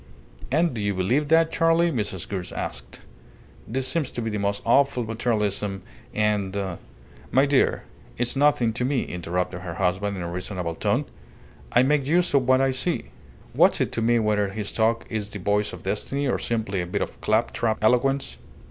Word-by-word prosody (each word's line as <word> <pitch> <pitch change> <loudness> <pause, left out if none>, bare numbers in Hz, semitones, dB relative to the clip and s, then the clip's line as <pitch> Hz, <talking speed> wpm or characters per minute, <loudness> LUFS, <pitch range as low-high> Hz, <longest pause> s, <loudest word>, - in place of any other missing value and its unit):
"And 165 +2 +2
do 110 - -4
you 100 -1 0
believe 120 +11 +1
that, 160 +1 +4
Charley?" 165 +1 +3
Mrs. 105 - -3
Gould 95 -3 -4
asked. 60 -1 -6 0.7
"This 130 +3 -1
seems 165 -6 0
to 120 - -4
me 110 -1 -2
most 100 0 -1
awful 130 +1 +3
materialism, 105 -4 -1 0.3
and 105 -2 0 0.4
" - - -23
"My 135 +2 +4
dear, 140 -1 +2 0.3
it's 120 +2 0
nothing 135 -5 +3
to 125 - -2
me," 130 0 +1
interrupted 90 +1 -3
her 85 -2 -6
husband, 95 +2 0
in 90 - -4
a 85 - -4
reasonable 90 -1 -3
tone. - - 0 0.7
"I 120 - +5
make 140 0 +2
use 175 +2 +2
of 135 -3 +3
what 130 0 +5
I 135 0 +3
see. 130 - -2 0.4
What's - - +4
it - - 0
to 115 - -2
me 120 +1 +3
whether 105 -2 +1
his 105 +1 -4
talk 115 +1 +1
is 105 -2 -4
the 105 - -6
voice 105 +2 0
of - - -10
destiny 105 +8 -2
or 125 - 0
simply 110 -5 -1
a 90 - -4
bit 90 - -1
of - - -9
clap 110 +2 +1
trap 110 -2 0
eloquence? 135 +4 +2
110 Hz, 185 wpm, -24 LUFS, 100-135 Hz, 0.7 s, I